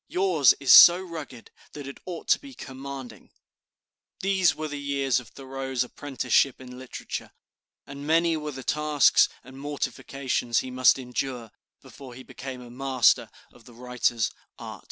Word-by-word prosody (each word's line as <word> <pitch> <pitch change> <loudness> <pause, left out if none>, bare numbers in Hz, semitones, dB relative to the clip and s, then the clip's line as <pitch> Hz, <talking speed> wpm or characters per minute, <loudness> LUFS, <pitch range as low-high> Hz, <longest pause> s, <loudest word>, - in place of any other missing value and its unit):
Yours 180 -8 +3
is 135 -3 +5
so 175 +1 +10
rugged 160 -9 -9 0.2
that 145 -2 -8
it 140 - -9
ought 175 -3 -7
to - - +4
be 275 -2 -13
commanding." 135 -5 -9 0.9
These 190 -2 +2
were 155 0 -5
the 145 -1 -6
years 140 -2 0
of 125 - -13
Thoreau's 135 -1 -4
apprenticeship 130 0 0
in 125 -1 -11
literature, 130 -1 -7 0.6
and 140 +1 -9
many 165 +1 +2
were 150 -1 -5
the 130 -1 -9
tasks 150 +1 +3
and 130 +1 -13
mortifications 135 -4 -2
he 130 - -8
must 130 +1 +4
endure 125 -2 -5 0.3
before 130 -3 -12
he 130 - -11
became 130 -1 -9
a 120 - -13
master 130 -1 +2 0.2
of 120 - -20
the 120 - -16
writer's 120 -3 -1 0.3
art. - - -9
135 Hz, 155 wpm, -26 LUFS, 125-145 Hz, 0.9 s, so